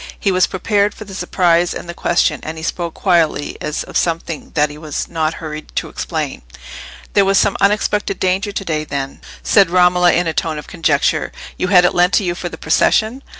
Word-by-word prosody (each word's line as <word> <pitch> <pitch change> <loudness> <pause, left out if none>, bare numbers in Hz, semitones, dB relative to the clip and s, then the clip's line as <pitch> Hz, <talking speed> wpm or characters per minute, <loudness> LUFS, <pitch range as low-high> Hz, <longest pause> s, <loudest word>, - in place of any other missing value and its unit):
He 200 - +1
was 185 0 +3
prepared 205 +2 0
for 215 - -9
the 195 - -10
surprise 175 -2 +1
and - - -7
the 170 - -5
question, 170 -3 +1
and 160 +1 -6
he 160 - -7
spoke 170 0 -3
quietly, 165 -6 +1
as 150 - -3
of - - -12
something 165 -2 -2
that 150 -1 +2
he 150 - -10
was 155 -2 -4
not 160 -1 -1
hurried 155 -1 -8
to - - -2
explain. - - -4 0.7
"There 200 - +5
was 195 0 +2
some 200 - +3
unexpected 205 0 +1
danger 190 +3 0
to 195 -1 -4
day, 155 -3 -1
then?" 140 -2 -5 0.2
said 200 -4 +4
Romola, 180 0 +4
in 175 - +1
a 165 - -1
tone 155 -1 -2
of 150 - -7
conjecture. 150 -4 0 0.2
"You - - -2
had 180 -2 +6
it - - +2
lent 180 +2 +3
to - - +3
you 175 -2 -1
for 175 0 -5
the 160 - -9
procession?" 220 +10 +1
175 Hz, 210 wpm, -17 LUFS, 160-195 Hz, 0.7 s, had